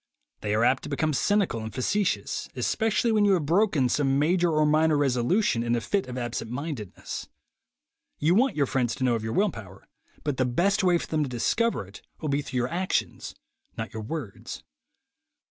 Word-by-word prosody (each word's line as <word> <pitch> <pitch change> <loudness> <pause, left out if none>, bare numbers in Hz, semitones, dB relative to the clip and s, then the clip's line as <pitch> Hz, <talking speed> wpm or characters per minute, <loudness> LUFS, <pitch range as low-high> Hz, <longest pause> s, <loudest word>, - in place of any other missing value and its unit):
They 105 0 -1
are 110 - +2
apt 130 +2 +3
to - - -7
become 155 +2 0
cynical 195 - +1
and 110 0 -5
face 130 +7 -1
tious, 205 -2 -1
especially 225 +1 +1
when 215 -1 +3
you 200 -1 +5
have 170 -6 +1
broken 170 -5 +3
some 135 +1 +1
major 170 +4 +2
or 155 -1 +3
minor 155 0 +3
resolution 135 - +2
in 120 0 +1
a - - +1
fit 195 - -1
of 125 0 -6
absent 120 -2 -3
mindedness. 125 - -5 0.9
You 160 +4 +2
want 255 +7 +3
your 145 - +2
friends 125 -3 0
to - - -4
know 125 -2 +3
of 115 -2 -2
your 110 0 -3
will 205 0 +2
power, 100 - -11 0.4
but 145 -3 -2
the 130 - +2
best 190 - +1
way 180 -2 +4
for - - -5
them 155 -1 -1
to 145 - -1
discover 125 - 0
it 95 +2 -13 0.2
will 155 - -3
be 140 +1 +1
through 130 -2 -5
your 125 0 +1
actions, 185 +2 -2 0.4
not - - -5
your 110 - -5
words. 115 -2 -6
145 Hz, 200 wpm, -26 LUFS, 120-180 Hz, 0.9 s, you